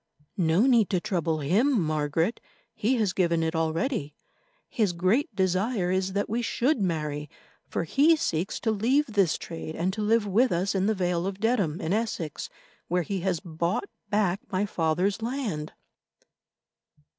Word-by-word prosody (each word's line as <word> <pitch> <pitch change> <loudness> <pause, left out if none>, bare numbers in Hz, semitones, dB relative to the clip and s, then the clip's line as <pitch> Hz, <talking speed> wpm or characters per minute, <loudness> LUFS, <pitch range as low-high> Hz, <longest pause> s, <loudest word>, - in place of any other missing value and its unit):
"No 165 +2 +3
need 235 -6 +4
to 185 - +1
trouble 165 -4 -1
him, 220 - +2
Margaret. 155 +4 0 0.3
He 235 +3 +1
has 210 -6 +1
given 170 -3 +1
it 160 +1 -1
already. 160 - -1 0.5
His 210 -6 0
great 200 - +1
desire 190 +1 +1
is 190 0 0
that 200 +1 0
we 230 +3 -1
should 245 +2 +1
marry, 150 -5 -2 0.4
for - - -1
he 285 - +4
seeks 175 - -2
to 225 - +1
leave 245 +8 +2
this 200 - +1
trade 165 -1 -7
and 180 +3 -1
to 215 - -4
live 215 +1 +2
with 225 +6 +3
us 180 +3 0
in 195 0 +1
the 220 - +2
Vale 180 -1 0
of 195 0 -5
Dedham, 205 -8 +1
in 160 - -1
Essex, 210 -9 -2 0.4
where 180 +1 +1
he 195 +4 -3
has 180 -2 0
bought 170 - -2 0.2
back 200 -3 +1
my 190 +2 +1
father's 180 +3 0
land." 225 - -3
190 Hz, 160 wpm, -27 LUFS, 165-220 Hz, 0.5 s, need